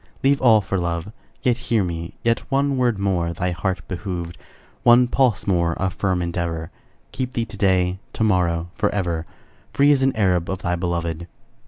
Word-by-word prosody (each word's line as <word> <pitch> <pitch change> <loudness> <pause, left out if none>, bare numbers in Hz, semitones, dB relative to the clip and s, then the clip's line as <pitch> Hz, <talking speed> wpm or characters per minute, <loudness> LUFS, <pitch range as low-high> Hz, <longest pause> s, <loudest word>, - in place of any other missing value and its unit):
Leave 140 +1 +3
all 115 -4 +6
for 95 -1 -2
love; 85 +3 -3 0.3
Yet, 125 -1 +2
hear 110 -4 +3
me, 85 -1 -5
yet, 115 0 +2
One 140 0 +1
word 125 -4 +1
more 90 -4 0
thy 90 +1 -1
heart 90 +2 -3
behoved, 90 -2 -5 0.5
One 120 +1 +6
pulse 125 -5 +1
more 85 -4 +1
of 95 -1 -1
firm 95 -3 0
endeavor, 85 -2 -3 0.4
Keep 130 -1 -4
thee 115 - -1
to 115 - -10
day, 95 -2 +2
To - - -1
morrow, 90 -4 +1
forever, 90 -6 -1 0.5
Free 140 +1 +5
as 140 -2 +3
an 135 0 +2
Arab 90 -4 +1
Of 95 0 -4
thy 90 0 0
beloved. 85 -1 -3
95 Hz, 175 wpm, -22 LUFS, 85-115 Hz, 0.5 s, all